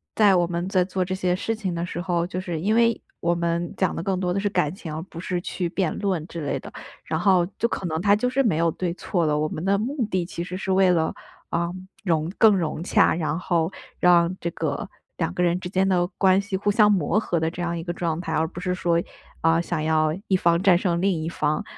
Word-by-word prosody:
在 205 -3 +5
我 175 - +3
们 170 +1 -3
在 185 -2 +3
做 185 0 -1
这 185 +1 -3
些 180 -1 0
事 225 +4 -2
情 195 -5 -3
的 170 - -2
时 175 -1 -5
候， 175 -1 0
就 180 - -4
是， 175 -3 -4
因 215 +4 +1
为 230 0 +3 0.2
我 170 0 +1
们 170 0 -1
讲 - - 0
的 165 - -4
更 190 -1 -1
多 180 -1 0
的 195 - 0
是 205 - 0
感 150 -3 0
情， 165 -6 -7
而 160 - -4
不 170 -2 -10
是 180 0 -2
去 180 0 -3
辩 180 -2 -1
论 190 -6 -1
之 170 - -6
类 140 - -1
的。 - - -10 0.3
然 160 - -2
后 185 -1 +4
就 235 - +1
可 185 - -3
能 160 0 -2
他 200 +2 +4
就 250 +4 0
是 270 +2 +1
没 190 -10 +2
有 170 +1 +3
对 170 +1 -2
错 175 -2 -1
了， 150 -1 +1
我 155 - +1
们 155 +2 -5
的 195 +1 +2
目 250 +1 -1
的 185 -2 +1
其 170 0 -5
实 180 +1 -6
是 190 0 -3
为 190 -1 +4
了， 160 -2 +1 0.4
呃， 170 +1 -1 0.3
融 165 -2 0
更 215 -3 +6
融 165 -2 -2
洽， - - +3
然 160 -1 -1
后 170 -1 0 0.3
让 175 0 +4
这 170 - -3
个， 155 -4 -3 0.3
两 165 0 -1
个 180 - -2
人 175 0 +2
之 180 - -6
间 190 +1 +1
的 175 -2 +3
关 190 -1 +5
系 200 -1 -3
互 205 +2 0
相 210 0 +5
磨 195 +1 +2
合 175 -6 -1
的 160 0 0
这 175 +1 -5
样 170 0 -1
一 165 - -5
个 175 - -3
状 170 -1 -2
态， 165 - -5
而 160 +1 +1
不 170 - -9
是 180 0 -1
说， 170 -2 +1 0.4
嗯， 165 +1 +3
想 170 -3 -2
要 155 -1 +2
一 190 - +3
方 170 0 +2
战 190 -3 +5
胜 175 -2 0
另 195 +1 +3
一 - - -3
方， 150 -2 -1
175 Hz, 280 characters per minute, -24 LUFS, 170-190 Hz, 0.4 s, 更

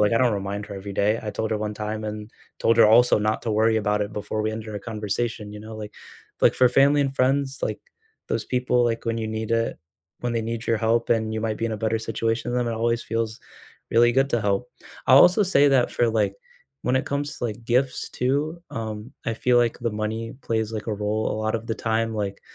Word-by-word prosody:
like, 105 +2 +3
I - - +4
don't 125 -2 +3
remind 100 +1 -4
her - - -8
every 100 0 -7
day. 105 +4 +2
I 105 - -3
told 110 +1 -3
her 110 - 0
one 105 0 -3
time 110 +1 -4
and 105 0 -6 0.3
told 115 0 +2
her 115 - +8
also 120 +2 +6
not 105 +1 0
to 115 - -1
worry 110 +1 +3
about 105 -1 +1
it 105 - -5
before 105 +1 -3
we 110 - 0
ended 110 0 -6
our 105 - -4
conversation, 105 0 -3
you 105 - -8
know, 110 0 -9
like 105 -1 -7 0.5
like - - +5
for 125 - +5
family 140 +3 +4
and 135 -1 -2
friends, 135 +1 +1
like, - - -2 0.5
those - - -1
people, 125 -1 +1
like, 115 -1 -1
when 115 0 0
you 110 -1 -3
need 110 0 -4
it. 115 0 0 0.4
When 120 -1 -2
they 115 - 0
need 115 +1 -4
your 115 -2 +2
help 115 +1 +1
and 110 -1 +1
you 110 - -2
might 110 -1 -2
be 115 - 0
in 115 - -3
a 110 - -2
better 110 +1 0
situation 115 +1 -2
than 125 - +1
them, - - 0
it 110 - -4
always 115 +1 0
feels 115 -1 -3 0.5
really 120 +1 +5
good 135 +2 +2
to 120 - +1
help. 100 +3 0 0.4
I'll 130 - +8
also 180 +7 +6
say 145 -6 +4
that, 130 -3 +3
for, 120 - +1
like, 110 -1 +1 0.5
when 125 - +1
it 130 - -1
comes 145 +1 -3
to, - - -4
like, 115 0 -4
gifts 125 +3 0
too, 150 +7 -1
um, 110 0 -5
I 115 - 0
feel, 125 +2 +2
like, 120 -1 +2
the 120 -1 -1
money 110 +3 -3
plays, 110 -2 -1
like, 110 -1 -5
a 110 - 0
role 105 +1 -1
a - - -3
lot 110 0 0
of 115 - -8
the 115 - -1
time. 115 0 -1
Like, 100 -2 -3
115 Hz, 245 wpm, -24 LUFS, 110-120 Hz, 0.5 s, her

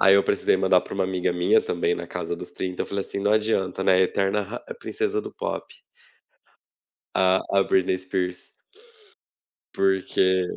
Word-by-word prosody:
aí 95 +1 +7
eu 100 - +5
precisei 100 - +2
mandar 95 -1 +4
pra - - -9
uma 95 -1 0
amiga 90 -1 -1
minha, 90 0 +3
também 85 0 -1
na 85 0 -6
casa 85 -1 -4
dos 90 - -9
30, 90 -1 -4
eu - - -6
falei 100 0 -2
assim: - - -5
"Não 105 +1 +2
adianta, 105 -3 0
né, 95 -1 +5
eterna 95 +2 +1
ra - - -6 0.2
princesa - - -1
do - - -9
pop". - - -4 1.5
A 95 0 +4
a 100 0 +3
Britney 95 0 +2
Spears. 90 -1 -4 1.2
Porque 95 -1 +2
95 Hz, 165 wpm, -24 LUFS, 90-95 Hz, 1.5 s, aí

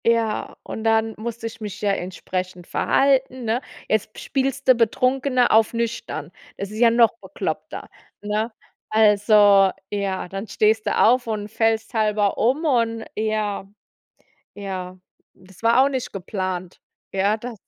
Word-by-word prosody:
Ja, 230 -2 +1
und 220 - -6
dann 225 0 +2
musste 230 +1 -6
ich 225 - -7
mich 210 -1 -6
ja 205 -1 +2
entsprechend 185 -1 -4
verhalten, 265 +1 +1
ne? 230 +3 0 0.3
Jetzt 215 0 -1
spielst 270 0 -2
du 255 - +9
Betrunkene 255 +2 +2
auf 220 +1 +4
nüchtern. 235 0 -3 0.3
Das 200 0 -5
ist 215 - -6
ja 235 -1 +6
noch 230 -1 +4
bekloppter, - - -5 0.3
ne? 210 +3 -2 0.4
Also, 205 -2 +5 0.2
ja, 200 -3 -2
dann 195 +4 -6
stehst 215 +1 +1
du - - +1
auf 245 +2 +4
und 210 -2 -3
fällst 225 +1 0
halber 210 -2 +1
um 265 +8 +1
und 230 -5 +1
ja, 215 -2 -2 0.9
ja, 185 -2 -6 0.4
das 185 +1 -19
war 235 +3 +5
auch - - +3
nicht 260 -3 -4
geplant. 185 -2 -4 0.3
Ja, 200 +2 +2
da 235 +2 -7
220 Hz, 145 wpm, -22 LUFS, 200-235 Hz, 0.9 s, du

